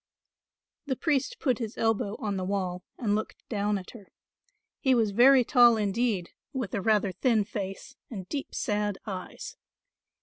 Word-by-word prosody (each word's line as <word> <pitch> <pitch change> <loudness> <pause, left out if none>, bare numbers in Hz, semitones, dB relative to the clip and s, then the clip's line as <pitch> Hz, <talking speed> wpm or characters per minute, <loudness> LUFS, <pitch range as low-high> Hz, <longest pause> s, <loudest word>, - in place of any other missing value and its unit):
The 265 - 0
priest 310 - 0
put 255 -6 +1
his 225 -2 -5
elbow 220 -2 0
on 205 -2 -2
the 190 - -2
wall 185 -2 -2
and 215 -5 0
looked 215 +1 -4
down 210 -2 0
at 185 - -9
her. 205 -6 -14 0.7
He 265 -1 +3
was 225 -3 +2
very 255 +5 +6
tall 240 -2 +6
indeed, 210 -3 0 0.2
with 255 -8 -3
a 200 - -1
rather 210 -2 +2
thin 215 +3 +2
face 200 +4 -6
and 190 -6 -7
deep 280 -2 -5
sad 210 -2 -1
eyes. 185 -3 -7
210 Hz, 160 wpm, -28 LUFS, 195-245 Hz, 0.7 s, very